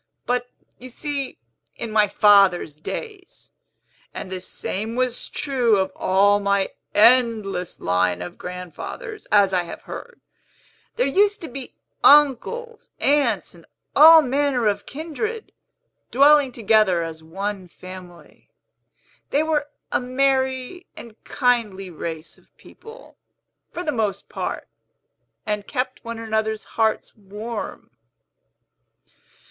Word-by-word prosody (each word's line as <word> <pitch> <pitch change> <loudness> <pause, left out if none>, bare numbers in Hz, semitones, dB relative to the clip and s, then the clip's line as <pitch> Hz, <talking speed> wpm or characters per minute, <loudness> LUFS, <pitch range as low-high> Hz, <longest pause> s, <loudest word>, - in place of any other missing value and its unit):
But, 245 0 -1 0.3
you 255 - -10
see, 280 +1 -4 0.4
in 230 - -6
my 215 -1 +4
father's 195 -7 +4
days 385 - -8 0.6
(and 185 - -6
the 185 -1 -5
same 215 +4 -4
was 255 -1 -2
true 250 -7 +1
of 190 0 0
all 200 +2 +3
my 200 -1 0 0.2
endless 220 -5 +3
line 90 0 +1
of 90 - -8
grandfathers, 180 - -8
as 200 -2 +4
I 180 - +3
have 170 - -9
heard), 485 - -9 0.8
there 250 - +1
used 405 +9 +2
to 330 - -6
be 260 0 -9 0.3
uncles, 295 - +3
aunts, 275 -8 +1
and 170 -2 -18 0.3
all 320 +2 +9
manner 270 -2 0
of 205 -1 0
kindred, 335 +10 -5 0.6
dwelling 285 0 +5
together 215 -6 +2
as 160 -1 -7
one 195 +3 -5
family. 180 -1 -13 0.8
They 290 +3 +2
were 300 -2 -1 0.2
a - - +2
merry 260 +5 -1
and 230 -2 -13
kindly 225 -8 0
race 160 0 -7
of - - -32
people, 455 +2 -15 0.5
for 355 - -5
the 305 - -1
most 210 -6 -2
part, - - -5 0.8
and 210 -2 -3
kept 255 -1 -3
one 230 -1 -6
another's 220 -1 -2
hearts 220 -1 0
warm." 210 +2 -7
230 Hz, 120 wpm, -22 LUFS, 195-275 Hz, 0.8 s, all